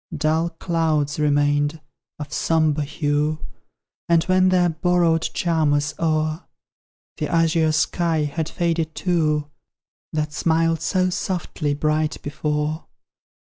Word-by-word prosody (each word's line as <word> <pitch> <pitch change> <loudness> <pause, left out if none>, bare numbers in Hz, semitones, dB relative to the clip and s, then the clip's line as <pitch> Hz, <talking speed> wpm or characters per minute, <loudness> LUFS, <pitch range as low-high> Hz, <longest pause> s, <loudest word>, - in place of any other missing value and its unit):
Dull 160 +2 +1
clouds 160 -3 -1
remained, 145 +1 +1 0.4
of 150 -1 -7
sombre 155 -2 +1
hue, 150 +1 0 0.7
And 165 -1 +4
when 185 +1 +3
their 180 -1 +3
borrowed 170 0 +2
charm 165 -4 0
was 145 +1 +1
o'er, 155 0 0 0.7
The - - -2
azure 165 -1 +2
sky 160 0 +1
had 155 +2 -3
faded 165 -2 -1
too, 150 -5 0 0.6
That 150 -1 -2
smiled 165 0 +1
so 185 +2 +1
softly 170 -5 -2
bright 155 +1 0
before. 150 +1 -2
155 Hz, 110 wpm, -22 LUFS, 150-165 Hz, 0.7 s, And